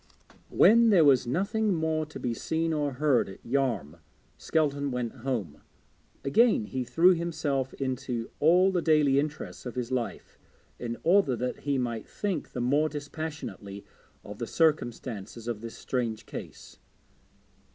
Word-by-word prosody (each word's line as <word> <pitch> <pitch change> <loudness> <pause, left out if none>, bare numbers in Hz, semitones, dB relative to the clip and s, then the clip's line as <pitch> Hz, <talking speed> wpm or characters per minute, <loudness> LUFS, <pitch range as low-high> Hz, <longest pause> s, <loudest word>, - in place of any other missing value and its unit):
When 230 +1 +6
there 180 -7 +6
was 130 -4 +4
nothing 200 - 0
more 160 -1 -1
to 155 - -9
be 120 - -2
seen 160 +7 -1
or 145 -2 -1
heard 140 -4 +2
at 95 - -13
Yarm, 120 - -1 0.4
Skelton 145 -3 0
went 125 -1 -3
home. 115 - -3 0.6
Again 215 - +3
he 130 +3 -3
threw 170 +8 +4
himself 150 -6 -2
into 130 -3 -3
all 180 +5 +5
the 180 -2 0
daily 150 -4 +4
interests 150 +1 -4
of 125 - -7
his 125 0 -3
life 125 -3 -4 0.4
in 120 -1 -4
order 175 -7 +4
that 125 +1 -3
he 140 -1 -1
might 120 -3 -3
think 200 -4 -3
the 125 - -3
more 145 +5 +2
dispassionately 145 -9 -6 0.4
of 105 0 -9
the 120 - -3
circumstances 120 - -1
of 115 -3 -3
this 115 0 -8
strange 115 -4 -3
case. - - -9
135 Hz, 145 wpm, -28 LUFS, 120-160 Hz, 0.6 s, When